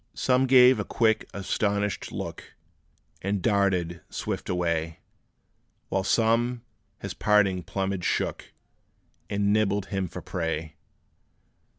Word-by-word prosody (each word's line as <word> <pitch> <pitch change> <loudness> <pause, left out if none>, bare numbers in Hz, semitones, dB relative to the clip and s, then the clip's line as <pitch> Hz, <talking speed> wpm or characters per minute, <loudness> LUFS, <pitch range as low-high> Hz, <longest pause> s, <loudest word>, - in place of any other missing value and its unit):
Some 130 +1 +2
gave 125 0 +7
a - - 0
quick, 110 -2 +1
astonished 100 +1 -1
look, - - -7 0.7
And 100 +1 -1
darted 95 -5 +1
swift - - -4
away; 85 -2 -1 0.9
While 95 0 0
some 115 +3 +1 0.3
his 100 -3 -6
parting 100 -3 +2
plumage 95 +2 -3
shook, - - -2 0.8
And 100 0 +1
nibbled 105 -2 +1
him 95 -1 -1
for - - -8
prey. 80 -2 -3
100 Hz, 105 wpm, -26 LUFS, 90-110 Hz, 0.9 s, gave